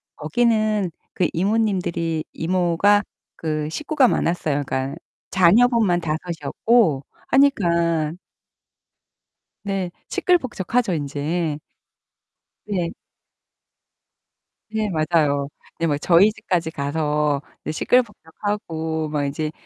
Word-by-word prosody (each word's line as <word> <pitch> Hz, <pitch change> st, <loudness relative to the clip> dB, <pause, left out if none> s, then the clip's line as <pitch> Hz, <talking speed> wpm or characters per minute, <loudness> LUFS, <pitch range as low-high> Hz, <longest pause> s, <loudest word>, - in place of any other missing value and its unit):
거기는 215 Hz, +2 st, +1 dB, 0.2 s
그 180 Hz, -, +1 dB
이모님들이 180 Hz, -5 st, 0 dB
이모가 185 Hz, +4 st, +2 dB, 0.3 s
그 155 Hz, -1 st, -2 dB
식구가 295 Hz, -, +2 dB
많았어요. 155 Hz, -8 st, 0 dB
그니까 130 Hz, +1 st, -2 dB, 0.3 s
자녀분만 195 Hz, 0 st, +4 dB
5 155 Hz, -2 st, -1 dB, 0.2 s
이었고 155 Hz, -, +2 dB, 0.2 s
하니까 170 Hz, -, +2 dB, 1.5 s
네 195 Hz, -3 st, -2 dB, 0.2 s
시끌벅적하죠 245 Hz, -, +1 dB
인제. 150 Hz, +1 st, -2 dB, 1.1 s
네. 185 Hz, -5 st, -2 dB, 1.8 s
네. 220 Hz, 0 st, -1 dB
맞아요. 155 Hz, -4 st, +1 dB, 0.3 s
네 165 Hz, -, +1 dB
뭐 145 Hz, -2 st, +1 dB
저희 180 Hz, +7 st, +5 dB
집까지 175 Hz, -5 st, -2 dB
가서 150 Hz, 0 st, 0 dB, 0.3 s
시끌벅적하고 160 Hz, -5 st, -1 dB
막 150 Hz, -1 st, -1 dB
이제 150 Hz, +2 st, -2 dB
170 Hz, 200 characters per minute, -22 LUFS, 155-210 Hz, 1.8 s, 저희